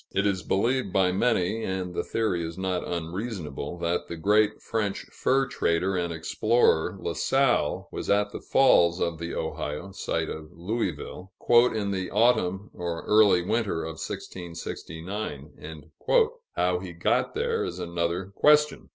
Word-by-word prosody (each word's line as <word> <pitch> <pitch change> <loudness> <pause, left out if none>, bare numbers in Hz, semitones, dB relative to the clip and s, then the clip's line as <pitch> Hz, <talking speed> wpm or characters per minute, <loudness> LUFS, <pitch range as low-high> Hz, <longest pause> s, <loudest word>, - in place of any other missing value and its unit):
It 95 - +1
is 95 -2 +1
believed 115 +3 0
by 95 -1 +3
many, 110 +1 +1
and 95 -2 -3
the - - -1
theory 100 -7 -1
is 85 +1 -6
not 95 -1 -2
unreasonable, 85 - -4
that 85 +1 -1
the 85 - -5
great 105 +5 +3
French 105 -3 -2
fur 135 +1 +2
trader 95 -5 0
and 85 -1 -1
explorer, 85 +1 +2
La - - -3
Salle, 135 - +1
was - - -5
at 105 0 +2
the - - -7
Falls 90 -10 +4
of 85 -1 -1
the 85 0 -4
Ohio 75 +6 -4
(site 85 -4 -2
of 75 0 -7
Louisville) 90 -1 -4
"in 120 -4 +4
the 95 -2 -2
autumn 105 -3 +2
or 85 -1 -4
early 105 -4 +5
winter 105 -4 -1
of 80 -1 -6
1669." 80 -3 -7 0.6
How 90 0 +1
he 90 -1 -8
got 85 - 0
there, - - 0
is - - -4
another 85 +2 -2
question. 150 +5 +3
95 Hz, 145 wpm, -27 LUFS, 85-105 Hz, 0.6 s, early